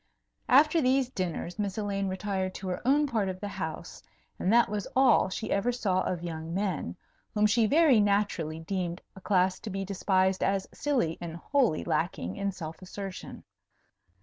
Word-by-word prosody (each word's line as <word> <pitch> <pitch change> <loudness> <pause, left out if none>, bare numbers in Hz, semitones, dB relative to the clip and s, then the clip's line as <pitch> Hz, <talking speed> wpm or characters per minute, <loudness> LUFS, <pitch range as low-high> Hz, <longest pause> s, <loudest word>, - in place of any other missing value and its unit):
After 300 +5 +5
these 260 -1 +2
dinners, 180 - -4
Miss 200 -1 -2
Elaine 200 -2 -1
retired 190 0 -2
to 190 - -6
her 180 - -3
own 290 +3 +4
part 220 -8 0
of 185 0 -5
the 205 - -4
house; 160 -5 -6 0.4
and 185 - +1
that 235 +1 +5
was 205 -1 -3
all 260 -7 +5
she 215 +3 -4
ever 200 +5 +1
saw 195 -6 0
of 175 -2 -2
young 165 0 -5
men, 185 - -2 0.4
whom 210 0 +3
she 220 +1 +3
very 295 -3 +5
naturally 200 -6 +1
deemed 175 0 -3 0.2
a 190 - -12
class 185 -2 +2
to 220 - -7
be 195 0 -3
despised 190 -1 +1
as 195 -1 0
silly 250 - 0
and 170 -1 -5
wholly 235 - +1
lacking 85 +2 -1
in 200 0 -1
self 160 -3 -8
assertion. 195 +1 -8
195 Hz, 175 wpm, -29 LUFS, 180-220 Hz, 0.4 s, After